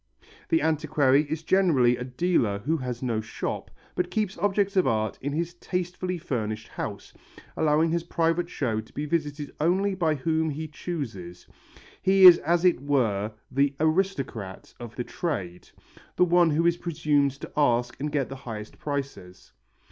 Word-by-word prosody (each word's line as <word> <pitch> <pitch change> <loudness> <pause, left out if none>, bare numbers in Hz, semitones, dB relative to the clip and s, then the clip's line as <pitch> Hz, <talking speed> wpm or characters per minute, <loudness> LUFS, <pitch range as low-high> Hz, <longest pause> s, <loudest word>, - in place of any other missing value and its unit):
The 330 - +2
antiquary 150 -2 +2
is 160 0 -3
generally 155 -10 +3
a 125 - -5
dealer 125 - 0
who 145 +11 -1
has 125 -3 -5
no 115 -3 0
shop, 110 - -5 0.2
but 180 0 -1
keeps 205 0 -1
objects 200 +1 +1
of 185 -7 +3
art 110 -3 0
in 145 - -2
his 170 +3 -2
tastefully 180 +1 -3
furnished 110 -9 -4
house, - - -6 0.4
allowing 160 +1 +2
his 170 0 0
private 170 0 0
show 115 -9 -1
to 110 - -20
be 145 - -3
visited 150 -2 -2
only 190 +6 +2
by 165 -5 +1
whom 160 +3 0
he 155 +2 -4
chooses. 115 - -6 0.6
He 190 0 +5
is 175 -2 +11
as 170 +3 +1
it 175 -8 +3
were 115 -8 0 0.2
the 140 +1 +1
aristocrat 155 - -1
of 120 -1 -9
the 125 - -3
trade, 95 - -4 0.5
the 180 - +4
one 175 -1 +4
who 160 +2 +1
is 170 0 +3
presumed 150 -5 +1
to - - -8
ask 120 -4 +2
and 150 +2 -3
get 140 -3 0
the 135 - -7
highest 110 -5 -8
prices. 135 -11 -6
150 Hz, 165 wpm, -26 LUFS, 125-170 Hz, 0.6 s, is